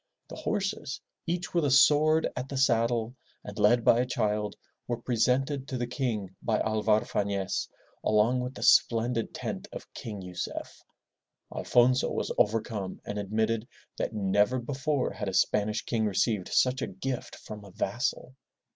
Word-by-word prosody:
The -, -, -7 dB
horses, 195 Hz, -9 st, -2 dB, 0.3 s
each 175 Hz, +1 st, -2 dB
with 170 Hz, -2 st, +2 dB
a 145 Hz, -, +2 dB
sword 150 Hz, +4 st, +5 dB
at 125 Hz, +1 st, -4 dB
the 140 Hz, -, -4 dB
saddle 115 Hz, -2 st, +2 dB, 0.3 s
and 105 Hz, +1 st, -8 dB
led 115 Hz, +3 st, +4 dB
by 115 Hz, -, +6 dB
a 125 Hz, -, +2 dB
child, 105 Hz, -3 st, -1 dB, 0.3 s
were 120 Hz, -, -1 dB
presented 130 Hz, +4 st, +1 dB
to 130 Hz, -, -3 dB
the 120 Hz, -, -1 dB
King 115 Hz, -7 st, -3 dB
by 110 Hz, -2 st, +1 dB
Alvar 110 Hz, 0 st, +2 dB
Fafiez 100 Hz, -3 st, -1 dB, 0.3 s
along 110 Hz, +4 st, +3 dB
with 125 Hz, +1 st, -4 dB
the -, -, -6 dB
splendid 115 Hz, 0 st, +3 dB
tent -, -, -5 dB
of -, -, -10 dB
King 105 Hz, -3 st, -6 dB
Yucef. 90 Hz, -1 st, -6 dB, 0.7 s
Alfonso 125 Hz, +1 st, +3 dB
was -, -, -2 dB
overcome 105 Hz, -3 st, 0 dB
and 105 Hz, 0 st, -4 dB
admitted 110 Hz, +3 st, -1 dB, 0.3 s
that -, -, -1 dB
never 105 Hz, +3 st, +2 dB
before 135 Hz, +2 st, -1 dB
had 105 Hz, -1 st, -4 dB
a 95 Hz, -, -4 dB
Spanish 105 Hz, +1 st, +1 dB
king 110 Hz, -2 st, 0 dB
received 105 Hz, -1 st, 0 dB
such 130 Hz, +1 st, +2 dB
a -, -, -1 dB
gift 130 Hz, -2 st, -5 dB
from 105 Hz, -1 st, -9 dB
a 100 Hz, -, -12 dB
vassal. 120 Hz, +6 st, -2 dB
115 Hz, 155 wpm, -29 LUFS, 105-130 Hz, 0.7 s, by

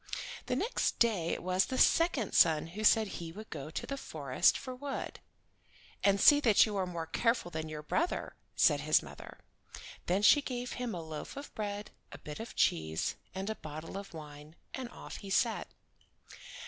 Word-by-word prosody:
The -, -, 0 dB
next 465 Hz, -, 0 dB
day 205 Hz, -8 st, +2 dB
it -, -, -3 dB
was 185 Hz, +1 st, +2 dB
the 260 Hz, -, -4 dB
second 325 Hz, -, +3 dB
son 155 Hz, -1 st, +5 dB
who 215 Hz, +2 st, -5 dB
said 220 Hz, +1 st, +5 dB
he 170 Hz, -4 st, -6 dB
would 215 Hz, +5 st, -10 dB
go 150 Hz, -1 st, -6 dB
to 160 Hz, -, -4 dB
the 275 Hz, -, -4 dB
forest 145 Hz, -, +1 dB
for 260 Hz, -1 st, -7 dB
wood. 275 Hz, +2 st, -5 dB, 0.8 s
"And 200 Hz, 0 st, +4 dB
see 290 Hz, +6 st, +8 dB
that 225 Hz, -8 st, +5 dB
you 215 Hz, -2 st, -4 dB
are 190 Hz, -1 st, 0 dB
more 170 Hz, -2 st, -4 dB
careful 230 Hz, +2 st, 0 dB
than 160 Hz, -1 st, -4 dB
your 150 Hz, -1 st, -6 dB
brother," 325 Hz, -, -1 dB, 0.2 s
said -, -, +4 dB
his -, -, +3 dB
mother. -, -, -11 dB, 0.7 s
Then 190 Hz, +4 st, +1 dB
she 290 Hz, +7 st, +7 dB
gave 250 Hz, -2 st, -4 dB
him 245 Hz, -5 st, -3 dB
a 170 Hz, -, -5 dB
loaf 160 Hz, -, -7 dB
of 280 Hz, -, -8 dB
bread, 205 Hz, -1 st, -4 dB, 0.2 s
and -, -, -8 dB
a -, -, -32 dB
bit 150 Hz, -1 st, -7 dB
of 225 Hz, -, -7 dB
cheese, 80 Hz, 0 st, +1 dB, 0.2 s
and 190 Hz, +1 st, -3 dB
a 220 Hz, -, -1 dB
bottle 155 Hz, +1 st, -8 dB
of 195 Hz, 0 st, -7 dB
wine, 150 Hz, -1 st, -11 dB, 0.2 s
and 255 Hz, -3 st, -5 dB
off -, -, -9 dB
he 200 Hz, -, -9 dB
set. 225 Hz, +3 st, +1 dB
195 Hz, 190 wpm, -32 LUFS, 160-235 Hz, 0.8 s, see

